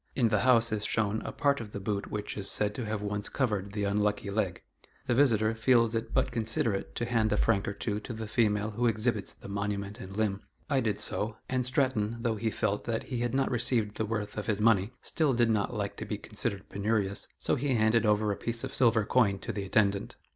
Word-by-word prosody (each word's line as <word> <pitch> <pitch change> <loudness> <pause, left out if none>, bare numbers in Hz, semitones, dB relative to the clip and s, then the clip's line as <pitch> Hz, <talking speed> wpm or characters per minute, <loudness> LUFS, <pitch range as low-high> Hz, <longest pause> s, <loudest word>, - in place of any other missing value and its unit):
In 120 -4 +3
the 105 -1 +2
house 115 -1 +4
is 105 -1 -1
shown 110 0 0
a - - -5
part 140 -3 +1
of 105 -2 -9
the - - -4
boot 100 0 -3
which 105 -1 -4
is 100 -1 -4
said 105 -1 0
to 120 -2 -4
have 105 -1 -2
once 105 0 -2
covered 105 -7 -1
the 105 -1 -2
unlucky 105 0 0
leg. 100 -3 -1 0.4
The 125 - +1
visitor 115 -5 +3
feels 115 0 +3
it 115 0 -2
but - - +1
considerate 115 -2 0
to 120 - -1
hand 115 -2 +1
a 105 - +2
franc 105 -3 +2
or 100 - -1
two 105 0 -3
to 110 - -8
the 110 -1 -5
female 105 -1 +1
who 120 +3 +1
exhibits 110 -1 0
the - - -12
monument 100 +1 -3
and 95 -2 -8
limb. 105 -2 0 0.3
I 135 - +4
did 110 -5 -1
so, 105 +1 -1
and 130 0 0
Stratton, 125 -4 0
though 115 -2 0
he 110 +2 0
felt 105 -1 -1
that 115 -1 -1
he 125 -3 -4
had 120 +1 -1
not 135 0 +1
received 115 -3 +1
the 110 - 0
worth 105 -1 -3
of 105 - -6
his 105 -2 0
money, 105 -2 +4
still 150 -6 +1
did 120 -1 +3
not 105 -2 +1
like 100 -1 -3
to - - -4
be 105 - -3
considered 105 -1 -4
penurious, 100 -1 0
so - - +1
he 135 0 +1
handed 110 0 +3
over 105 -1 +2
a - - -1
piece 115 +4 -2
of 135 - -4
silver 115 -4 +3
coin 105 -6 +3
to - - -5
the 100 -2 -3
attendant. 100 0 +1
110 Hz, 235 wpm, -29 LUFS, 105-115 Hz, 0.4 s, house